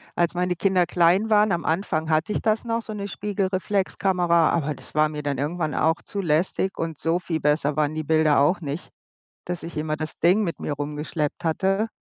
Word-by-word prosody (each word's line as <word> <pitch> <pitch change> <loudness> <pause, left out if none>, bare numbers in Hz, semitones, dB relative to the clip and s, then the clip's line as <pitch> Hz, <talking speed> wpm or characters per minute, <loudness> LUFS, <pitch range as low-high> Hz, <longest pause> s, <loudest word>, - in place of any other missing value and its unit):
als 175 0 +1
meine 180 0 0
Kinder 180 0 +2
klein 180 +6 +3
waren, 210 -1 +5
am 170 -1 -1
Anfang 160 -2 -1
hatte 160 +7 +1
ich - - 0
das 220 0 +1
noch, 230 -1 -2
so 220 - -7
'ne 200 -1 -4
Spiegelreflexkamera, 190 -3 +1
aber 150 -3 -1
das - - -14
war 155 0 +3
mir 150 -1 -6
dann 140 -2 -1
irgendwann 155 +1 -2
auch 160 +1 +1
zu 200 - -5
lästig 175 +3 0
und 165 -2 -4
so 165 +1 +1
viel 170 -3 -3
besser 150 0 +1
waren 150 0 0
die 155 - -2
Bilder 155 -1 +3
auch 155 +7 +3
nicht, 150 +3 -5 0.6
dass 180 -1 -4
ich 165 -1 -7
immer 155 0 -1
das 155 0 -6
Ding 185 +6 +4
mit 170 -4 -3
mir 145 - -3
rumgeschleppt 150 +2 -3
hatte. 195 +6 +1
170 Hz, 205 wpm, -24 LUFS, 155-190 Hz, 0.6 s, waren